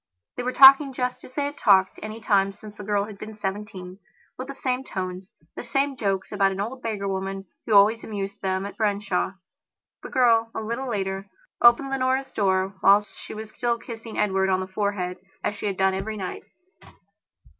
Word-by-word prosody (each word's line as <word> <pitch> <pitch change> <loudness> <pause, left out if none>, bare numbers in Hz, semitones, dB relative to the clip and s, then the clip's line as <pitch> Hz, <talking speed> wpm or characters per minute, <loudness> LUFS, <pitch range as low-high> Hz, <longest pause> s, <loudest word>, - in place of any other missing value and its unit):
They - - -3
were 250 +1 -1
talking 270 +1 +8
just 250 0 -3
as 255 - -13
they 285 - 0
had 290 +1 -5
talked 190 -3 +4
any 215 +1 -6
time 195 -2 +2
since 210 +1 -12
the 205 - -9
girl 205 0 +1
had 210 -2 -11
been 215 0 -8
seventeen; 195 -2 -6 0.4
with 255 - -7
the 275 - -7
same 255 -1 -2
tones, 185 -4 -5 0.3
the - - -5
same 275 +3 0
joke 195 -5 -1
about 200 -2 +2
an 190 - -5
old 240 +6 -4
beggar 210 -4 -3
woman 195 0 -3 0.2
who 215 - +3
always 215 +3 +5
amused 200 -2 -5
them 190 0 -1
at 200 - -8
Branshaw. 200 -4 0 0.7
The - - -8
girl, 230 -4 +3
a - - -1
little 235 +4 -3
later, 195 -2 -3 0.3
opened 240 +3 +6
Leonora's 265 0 0
door 190 -1 +1
whilst 205 +2 +4
she - - -9
was 220 0 -7
still 235 0 -1
kissing 230 -1 -9
Edward 190 -2 +1
on 185 -1 +2
the 185 - -3
forehead 190 -2 -2 0.2
as - - 0
she 205 - -4
had 195 -2 -2
done 190 0 +3
every 205 +3 -4
night. 190 -2 -6
210 Hz, 195 wpm, -25 LUFS, 195-235 Hz, 0.7 s, talking